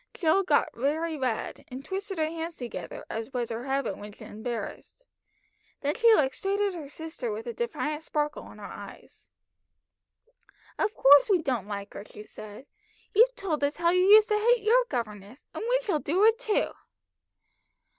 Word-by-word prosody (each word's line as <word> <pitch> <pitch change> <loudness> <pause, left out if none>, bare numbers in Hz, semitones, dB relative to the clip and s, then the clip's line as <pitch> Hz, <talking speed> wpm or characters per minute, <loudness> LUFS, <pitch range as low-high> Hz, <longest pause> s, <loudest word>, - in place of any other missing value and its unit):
Jill 335 +2 +3
got 335 -6 +2
very 310 +6 -1
red, 255 -6 -3
and 260 +3 -8
twisted 390 0 -4
her 315 - +2
hands 330 +1 -5
together, 245 -2 -7
as 225 +3 -5
was 240 -2 -2
her 230 +2 -4
habit 275 0 -1
when 205 0 -9
embarrassed. 235 - -7 0.8
Then 290 +1 0
she 465 +4 +5
looked 270 -6 +2
straight 395 +1 -1
at 405 -2 +1
her 320 -5 -7
sister 325 - -5
with 445 +2 -5
a 475 - -4
defiant 310 -11 -3
sparkle 300 -1 -3
in - - -14
her - - -11
eyes. - - -11 1.5
"Of 425 - 0
course 285 +5 +7
we 380 -3 +4
don't 245 -8 -1
like 200 -1 -6
her," - - -7
she 210 - -12
said. 215 +3 -11 0.5
"You've 485 +4 +5
told 315 -7 -2
us 285 +1 0
how 340 0 +3
you 365 +1 +3
used 425 +1 +8
to 425 0 +2
hate 475 0 +3
your - - +4
governess, 215 0 -5
and - - -5
we - - +3
shall 385 -10 0
do 360 +9 +2
it 450 +1 +4
too." 470 -4 0
315 Hz, 175 wpm, -28 LUFS, 255-410 Hz, 1.5 s, used